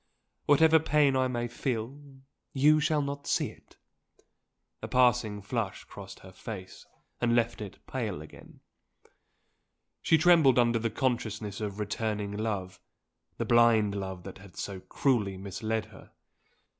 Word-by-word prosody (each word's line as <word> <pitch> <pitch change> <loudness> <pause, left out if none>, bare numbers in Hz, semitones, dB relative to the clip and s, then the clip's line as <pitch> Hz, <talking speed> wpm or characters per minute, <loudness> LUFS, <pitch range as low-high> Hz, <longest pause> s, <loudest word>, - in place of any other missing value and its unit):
Whatever 160 +2 +6
pain 150 -3 +3
I 130 0 +2
may 120 -1 -2
feel, 120 +1 -3 0.6
you 150 +3 +5
shall 150 -1 +1
not 140 0 -5
see - - 0
it!" - - -22 1.0
A - - -5
passing 120 -5 +2
flush 105 -2 -3
crossed - - -11
her 95 - -13
face, 95 -1 -9 0.3
and 120 -1 +2
left 120 -1 0
it 100 -2 -9
pale 110 - -3
again. 75 0 -14 1.4
She 160 - +4
trembled 160 -6 +5
under 120 -1 +3
the 115 +1 -1
consciousness 110 -5 -2
of 105 -1 -4
returning 105 -1 -2
love 100 -4 -3 0.6
the - - -2
blind 115 -3 +4
love 95 -2 -5
that 95 -1 -9
had 100 -1 -15
so 100 -2 -5
cruelly 105 -3 0
misled 110 +3 -3
her! 110 -2 -16
115 Hz, 135 wpm, -29 LUFS, 100-130 Hz, 1.4 s, Whatever